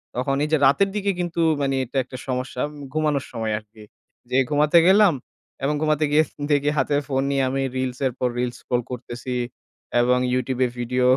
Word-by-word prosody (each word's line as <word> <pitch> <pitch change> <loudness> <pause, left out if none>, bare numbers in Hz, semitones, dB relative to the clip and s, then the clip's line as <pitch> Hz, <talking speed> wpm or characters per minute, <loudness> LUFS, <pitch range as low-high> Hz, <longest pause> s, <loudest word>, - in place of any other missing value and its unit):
তখন 135 +2 0
এই 150 - -1
যে 155 - +4
রাতের 195 +9 +4
দিকে 200 -1 +1
কিন্তু 170 -1 -1 0.2
মানে 135 -1 +1
এটা 130 +3 -6
একটা 130 +1 -9
সমস্যা 125 0 -3
উম 145 -1 -11
ঘুমানোর 150 -3 0
সময় 110 -2 -2
আর 110 - -21
কি। 110 -1 -13 0.5
যে 130 - +2
ঘুমাতে 150 +3 +4
গেলাম 195 -2 +6 0.5
এবং 145 +2 +1
ঘুমাতে 155 0 +2
গিয়ে 155 0 +4 0.2
দেখি 145 0 +3
হাতে 140 +2 +1
ফোন 135 -1 0
নিয়ে 135 -1 +1
আমি 135 +1 -1
reels 130 -1 -2
এর - - -2
পর 125 - +1
reels 120 -1 -1
scroll 125 0 -1
করতেছি 125 +1 -5 0.7
এবং 125 +1 +3 0.2
YouTube 130 0 -1
এ - - +1
ভিডিও 125 +1 0
135 Hz, 195 wpm, -23 LUFS, 125-150 Hz, 0.7 s, গেলাম